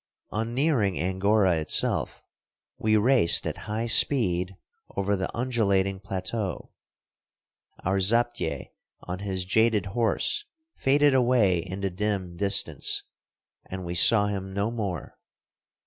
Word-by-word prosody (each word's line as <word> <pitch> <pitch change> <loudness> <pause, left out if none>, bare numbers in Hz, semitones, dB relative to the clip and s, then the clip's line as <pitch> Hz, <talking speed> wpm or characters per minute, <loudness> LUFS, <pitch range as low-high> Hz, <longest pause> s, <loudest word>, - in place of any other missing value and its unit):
On 115 +2 -3
nearing 130 - +1
Angora 95 +1 +1
itself, 75 -1 -1 0.6
we 110 0 +2
raced 115 -5 +3
at - - -3
high 110 +2 -2
speed 95 -7 +3 0.4
over 100 +1 0
the 95 -1 -3
undulating 100 -6 0
plateau. 95 +1 -5 1.1
Our 95 +2 +1
zaptieh 110 - -1 0.3
on 90 +1 -6
his 95 -2 -3
jaded 110 0 +2
horse 120 - 0 0.3
faded 145 +1 +3
away 120 -8 +3
in 95 +3 -6
the 95 -1 -2
dim 95 -2 -3
distance, 100 +1 +2 0.7
and 95 -1 -6
we 85 - -4
saw 105 +4 +5
him 95 -2 -4
no 100 +3 -1
more. 100 -8 -5
100 Hz, 115 wpm, -26 LUFS, 95-115 Hz, 1.1 s, saw